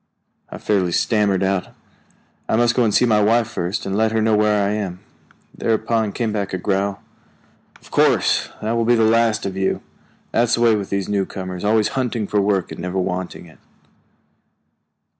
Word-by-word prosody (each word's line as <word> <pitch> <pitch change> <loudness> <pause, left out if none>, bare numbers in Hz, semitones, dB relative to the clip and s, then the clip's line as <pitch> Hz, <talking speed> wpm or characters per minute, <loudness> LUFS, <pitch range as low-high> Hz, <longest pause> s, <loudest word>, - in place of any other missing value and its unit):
I - - -8
fairly 95 -4 0
stammered 100 -3 +1
out, 95 -1 -1 0.7
"I - - +2
must 120 +1 +3
go 125 - +2
and 110 - +2
see 125 - +3
my 110 -3 +3
wife 115 +2 +3
first, 90 -4 -3
and 95 - -2
let 110 +1 +2
her 110 - +1
know 110 0 +2
where 105 -1 +2
I - - 0
am." 100 -4 -3 0.6
Thereupon 110 -1 0
came 115 -2 -2
back 100 -3 -3
a - - -2
growl: 100 +1 -1 0.8
"Of - - -19
course, - - +2
that 110 - -1
will 115 0 +1
be 120 +1 +3
the 115 - +3
last 115 0 +2
of 95 -1 -4
you! 95 0 -1 0.5
That's 120 0 +2
the 120 - -3
way 115 -2 +5
with 100 -2 -4
these 100 -1 -2
newcomers, 95 -2 -3
always 105 0 +2
hunting 125 -5 -2
for 105 +1 0
work 100 -2 0
and - - -7
never 90 +1 -3
wanting 90 -1 -3
it." 80 - -18
105 Hz, 185 wpm, -20 LUFS, 95-115 Hz, 0.8 s, way